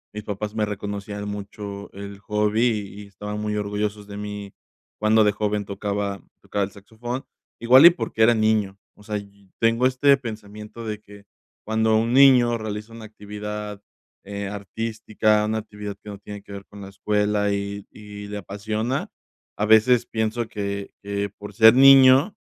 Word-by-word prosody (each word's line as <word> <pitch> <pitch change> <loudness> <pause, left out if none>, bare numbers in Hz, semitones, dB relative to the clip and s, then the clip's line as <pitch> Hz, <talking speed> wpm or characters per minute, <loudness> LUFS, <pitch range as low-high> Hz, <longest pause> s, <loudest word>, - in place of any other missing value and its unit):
mis 105 - -5
papás 105 +1 -5
me 105 -1 +1
reconocían 105 0 -5
mucho 100 0 -7
el 100 0 -8
hobby 105 +3 +1 0.2
y 100 +1 -11
estaban 105 +2 -7
muy 105 0 -2
orgullosos 105 0 -3
de 100 0 -8
mí 105 -1 -6 0.5
cuando 110 +1 +4
de 105 - +4
joven 105 0 -1
tocaba 100 0 -3 0.2
tocaba 100 -1 -1
el 100 - -11
saxofón 120 +6 -7 0.4
igual 130 +6 +7
y - - +13
porque 115 -7 -1
era 120 +1 +6
niño, 110 -3 +1 0.2
o 105 - -18
sea, 105 -1 -3
yi 100 -1 -13
tengo 115 +2 +2
este 140 +2 +4
pensamiento 110 -2 -8
de 105 -1 -5
que 100 -1 -15 0.4
cuando 110 0 +1
un 115 +2 0
niño 125 -3 +6
realiza 110 +1 -6
una 115 - -10
actividad, 105 -1 -7 0.4
eh, 100 0 -5
artística, 110 +1 -1
una 110 +1 -1
actividad 105 -2 -7
que 105 - -11
no 100 -1 -8
tiene 105 0 -9
que 100 - -12
ver 100 0 -8
con 100 - -14
la 95 - -8
escuela 105 +1 0
y 100 0 -4
y 105 -1 -10
le 105 0 -5
apasiona, 110 +6 -3 0.5
a 105 - 0
veces 110 +3 +5
pienso 110 +1 -2
que 100 -1 -4
que 100 0 -2
por 105 - -9
ser 110 0 +7
niño 135 +5 +7
105 Hz, 170 wpm, -23 LUFS, 100-110 Hz, 0.5 s, y